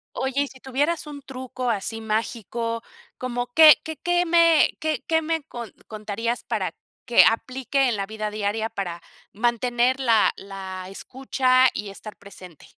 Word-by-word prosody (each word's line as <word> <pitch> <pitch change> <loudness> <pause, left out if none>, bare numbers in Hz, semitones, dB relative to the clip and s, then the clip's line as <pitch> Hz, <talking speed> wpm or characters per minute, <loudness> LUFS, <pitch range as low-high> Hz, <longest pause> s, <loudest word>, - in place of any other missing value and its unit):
Oye, 265 +1 -1
y - - -5
si 260 - -15
tuvieras 290 +6 -1
un 285 -1 -8
truco 255 -2 -5
así 225 +1 -2
mágico, 230 +1 -2 0.4
¿como 245 -1 -3
qué 315 -1 +9
qué 320 0 -5
qué 350 0 +1
me 335 -2 +5
qué 310 -5 -2
qué 320 0 +2
me 320 -1 -2 0.4
contarías 220 +2 -3
para - - -2 0.3
que 240 - +6
aplique 260 +3 +1
en 235 - 0
la 195 -1 -2
vida 215 0 -4
diaria 215 +2 -2
para 175 -5 -5 0.3
mantener 240 +3 +1
la 230 -5 +4
la 190 -2 -8
escucha 255 +4 +2
y 210 - -5
estar 210 +2 -10
presente? 185 -5 -14
240 Hz, 150 wpm, -24 LUFS, 215-270 Hz, 0.4 s, qué